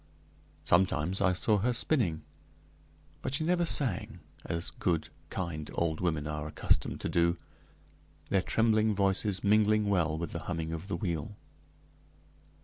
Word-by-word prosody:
Sometimes 90 0 +2
I 95 -1 +4
saw 105 +3 +2
her 125 +5 +1
spinning; 110 - 0 1.0
but 135 - 0
she 155 - +2
never 175 +1 +2
sang, 130 - +1 0.2
as 85 +1 -3
good, 85 -3 -1 0.2
kind 80 -4 -4
old 80 -2 -1
women 80 -4 0
are 75 0 -4
accustomed 75 - 0
to - - -2
do, 85 +1 +2 0.9
their 95 - +2
trembling 110 +1 +2
voices 100 0 +1
mingling 105 +1 +3
well 80 -5 +1
with 85 -1 -4
the - - -4
humming 80 -2 -3
of 80 +3 -6
the 95 - -2
wheel. 85 +1 -3
90 Hz, 140 wpm, -30 LUFS, 80-105 Hz, 1.0 s, I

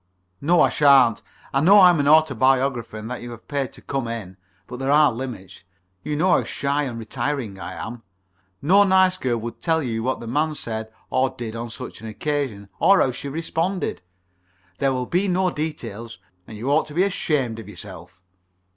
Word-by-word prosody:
(No, 170 +3 +4
I - - +4
shan't. 135 -6 +5 0.3
I 135 - +2
know 195 +6 +7
I'm 180 -3 +6
an 140 - +1
autobiographer 135 -5 +3
and 110 0 -7
that 125 - -5
you 120 - -7
have 120 -1 -11
paid 140 -3 -2
to - - -15
come 135 -4 -3
in, 110 -5 -6 0.3
but 125 - -8
there 135 0 -2
are 150 0 +5
limits. 115 -6 -7 0.4
You 150 +1 -3
know 180 +5 +2
how - - +4
shy 140 +1 -1
and 120 -3 -5
retiring 120 -2 -3
I 90 +1 -6
am. 110 +8 -7 0.6
No 195 +7 +6
nice 190 -1 +4
girl 125 -8 -1
would 115 +1 -7
tell 160 -2 +1
you 115 -3 -2
what 130 +3 -1
the - - -8
man 150 +6 0
said 110 -4 -5 0.2
or 130 0 +2
did 115 -3 -7
on 115 +1 -5
such 110 - -8
an 115 - -7
occasion, 120 -4 -3
or 195 0 +5
how 130 - +3
she 140 +3 -6
responded. 165 - -2 0.8
There 135 -1 +2
will 125 -1 -2
be 180 +8 0
no 185 0 +1
details. 115 -8 -5 0.3
And 110 - -9
you 125 +6 -2
ought 155 +2 +2
to 150 - -10
be 180 - +4
ashamed 140 - -1
of 105 -2 -10
yourself.) 90 -3 -11
135 Hz, 195 wpm, -23 LUFS, 115-155 Hz, 0.8 s, know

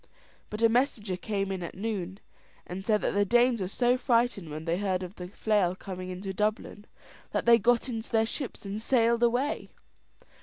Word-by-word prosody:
But 210 +2 -4
a - - +8
messenger 225 -5 0
came 195 +1 -2
in 190 -1 -3
at 170 - -6
noon, 195 -2 -4 0.5
and 185 +2 -6
said 210 0 +2
that - - 0
the 205 0 +3
Danes 240 +2 +3
were 185 - -1
so 245 +5 +2
frightened 235 - +1
when 155 +1 -6
they 170 +2 0
heard 190 -2 -1
of 180 0 -7
the 180 -3 -8
flail 200 -2 +1
coming 185 -1 -7
into 190 +1 -5
Dublin, 210 0 -2 0.5
that - - 0
they 235 0 +7
got 240 +3 +2
into 225 -3 -4
their 225 -1 +3
ships, 250 -1 -5
and 200 +2 -4
sailed 235 -1 +2
away. 245 +5 +1
210 Hz, 190 wpm, -28 LUFS, 185-235 Hz, 0.5 s, a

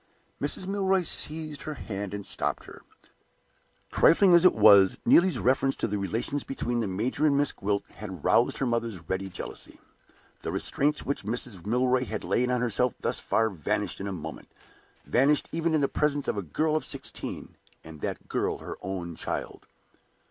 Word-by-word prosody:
Mrs. 145 +6 -1
Milroy 190 -1 +1
seized 155 -2 -2
her 155 - -5
hand 100 -5 -5
and 100 -1 -6
stopped - - -2
her. - - -13 1.1
Trifling 185 +2 +5
as 170 0 +7
it 185 - +6
was, 100 -3 +7
Neelie's 185 +1 +5
reference 135 +2 +2
to - - -2
the 105 -1 -2
relations 115 +8 -2
between 120 -3 -2
the 110 - -1
major 110 +10 -2
and 140 -2 +3
Miss 145 0 +2
Gwilt 100 0 -2
had 95 -7 -8
roused - - +3
her 135 - 0
mother's 115 -8 -2
ready 95 +2 -2
jealousy. 90 - -7 0.6
The - - -4
restraints 150 +2 0
which 140 - -2
Mrs. 105 -4 -4
Milroy 125 +2 +2
had 110 -3 -4
laid 125 +1 +1
on 125 -1 +1
herself 125 +1 +1
thus - - 0
far 110 -1 +1
vanished 85 +1 -2
in 100 - -4
a - - -3
moment 80 -4 -7 0.6
vanished 140 +4 +3
even 165 0 0
in 155 - +2
the 140 - +3
presence 145 -1 0
of - - 0
a 100 - -2
girl 155 - 0
of 155 - 0
sixteen, - - -5 0.3
and 80 -2 -11
that - - -4
girl - - -1
her - - -7
own 90 -3 -5
child! - - -5
120 Hz, 175 wpm, -27 LUFS, 100-145 Hz, 1.1 s, as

